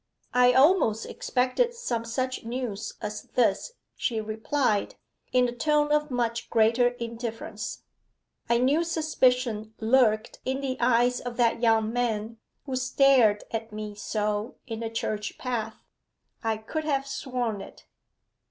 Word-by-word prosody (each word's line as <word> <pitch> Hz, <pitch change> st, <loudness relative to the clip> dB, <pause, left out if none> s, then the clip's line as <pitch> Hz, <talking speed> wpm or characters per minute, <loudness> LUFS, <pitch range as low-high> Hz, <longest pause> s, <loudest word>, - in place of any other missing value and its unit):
'I 250 Hz, 0 st, +5 dB
almost 265 Hz, -, +4 dB
expected 260 Hz, -, 0 dB
some 235 Hz, -, -3 dB
such 255 Hz, +2 st, -2 dB
news 230 Hz, -3 st, -4 dB
as 210 Hz, 0 st, -5 dB
this,' 235 Hz, -, +2 dB, 0.2 s
she 230 Hz, -4 st, -1 dB
replied, 220 Hz, +1 st, -1 dB, 0.4 s
in 250 Hz, -1 st, +4 dB
a -, -, -3 dB
tone 295 Hz, +4 st, +1 dB
of 300 Hz, 0 st, +2 dB
much 235 Hz, -2 st, -2 dB
greater 230 Hz, +2 st, +4 dB
indifference. 230 Hz, -1 st, -5 dB, 0.7 s
'I 235 Hz, -, +4 dB
knew 275 Hz, +7 st, +3 dB
suspicion 250 Hz, -9 st, +1 dB
lurked 220 Hz, -2 st, +2 dB
in 265 Hz, +1 st, -1 dB
the 270 Hz, -2 st, -2 dB
eyes 245 Hz, 0 st, +3 dB
of 245 Hz, -1 st, -6 dB
that 235 Hz, -1 st, +2 dB
young 225 Hz, -1 st, +3 dB
man 230 Hz, -2 st, -1 dB, 0.3 s
who 265 Hz, -2 st, -3 dB
stared 255 Hz, -4 st, +4 dB
at 225 Hz, 0 st, -4 dB
me 210 Hz, 0 st, -6 dB
so 210 Hz, +1 st, -2 dB
in 225 Hz, -3 st, -5 dB
the 230 Hz, -1 st, -3 dB
church 215 Hz, -2 st, -3 dB
path: 245 Hz, -4 st, -3 dB, 0.7 s
I 225 Hz, -1 st, 0 dB
could 265 Hz, +9 st, -4 dB
have 275 Hz, -3 st, 0 dB
sworn 250 Hz, -6 st, -3 dB
it. -, -, -12 dB
240 Hz, 135 wpm, -27 LUFS, 220-260 Hz, 0.7 s, I